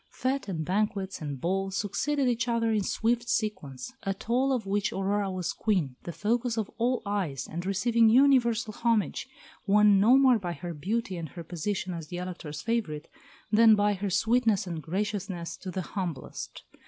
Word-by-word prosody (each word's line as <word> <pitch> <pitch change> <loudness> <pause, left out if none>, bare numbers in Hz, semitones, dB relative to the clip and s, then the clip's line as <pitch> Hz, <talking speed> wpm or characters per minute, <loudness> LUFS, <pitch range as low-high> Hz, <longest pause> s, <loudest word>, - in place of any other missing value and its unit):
Fêtes 260 0 -2
and 165 -5 -3
banquets 195 0 -1
and 145 -3 -4
balls 195 +4 -1
succeeded 270 +7 0
each 240 -1 0
other 230 -1 +1
in 215 -1 +2
swift 235 +4 0
sequence, 200 - -2
at 195 +1 -4
all 260 +3 +3
of 245 -6 0
which 200 +1 0
Aurora 195 +1 0
was 185 -2 -2
Queen, 180 - 0
the 170 - -4
focus 235 +5 -1
of 215 -3 -2
all 245 +1 +1
eyes, 180 -10 -2
and 170 +2 -5
receiving 225 +4 +3
universal 235 -3 +4
homage, 230 0 0 0.4
won 205 0 +6
no 235 +6 +6
more 260 -4 +5
by 175 -3 -3
her 170 +2 -6
beauty 190 +5 -2
and 165 -3 -5
her 170 - -8
position 180 +3 -3
as 165 -2 -6
the 175 - -6
Elector's 170 -5 -6
favourite 210 -11 -2 0.4
than 220 0 +7
by 205 0 +2
her 200 +1 -3
sweetness 220 +1 +2
and 170 -3 -5
graciousness 190 -1 -3
to 190 - -8
the 185 +1 -3
humblest. 170 -10 -5
205 Hz, 175 wpm, -28 LUFS, 180-230 Hz, 0.4 s, than